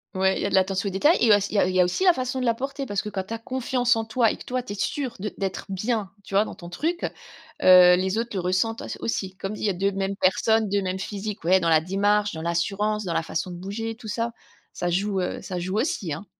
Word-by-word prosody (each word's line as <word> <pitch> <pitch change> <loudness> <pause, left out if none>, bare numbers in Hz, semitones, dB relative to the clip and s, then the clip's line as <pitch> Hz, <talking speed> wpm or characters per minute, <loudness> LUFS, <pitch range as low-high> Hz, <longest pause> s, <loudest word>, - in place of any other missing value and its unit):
Ouais, 190 0 +2
il - - -3
y - - -1
a - - -2
de - - 0
l'attention 190 +1 +1
aux - - -6
détails 295 - +4
et 225 - +6
auss 205 0 -1
il - - -8
y 205 - +3
a 185 - +3
il 185 - -2
y - - +3
a - - +7
aussi 180 - -1
la 360 -2 +6
façon 255 -1 -3
de 250 - -1
la 230 - +2
porter 275 +2 -4
parce 205 -3 -2
que 210 - -4
quand 200 -2 -3
tu - - -12
as 230 - -2
confiance 250 0 0
en 225 - -2
toi 225 0 +2
et - - -6
que - - -11
toi 255 0 -3
tu 205 - -6
es - - -6
sûr 250 +4 -2
de 210 +2 -3
d'être 195 -1 -3
bien, 210 +1 -1
tu 195 - -12
vois? 205 +2 +4
Dans - - -8
ton 175 - -11
truc, 330 - -2 0.6
heu, 180 -1 +8
les 190 +3 -1
autres 235 +1 -2
le 195 - -1
ressentent 185 +6 0
au - - -7
aussi. 190 -4 -3
Comme 195 +3 -4
il - - -9
y 210 - +2
a - - +1
2 195 +3 0
mêmes 195 0 -2
personnes, 220 +3 +2
2 200 0 +1
mêmes 185 0 -2
physiques, 205 +1 -5
ouais 185 +3 +4
dans 170 -2 0
la 160 -1 +6
démarche, 205 +4 +1
dans 160 - -6
l'assurance, 195 +6 -1
dans 170 - -2
la - - +1
façon 165 +2 -3
de 175 - -7
bouger 210 +5 -4
tout 235 -2 -10
ça, 230 +2 -2 0.4
ça 175 - -2
joue, 195 +2 0
heu, 180 - -3
ça 180 -2 -4
joue 185 +4 -2
aussi, 210 - -1
hein. 155 +8 -5
200 Hz, 295 wpm, -25 LUFS, 185-225 Hz, 0.6 s, heu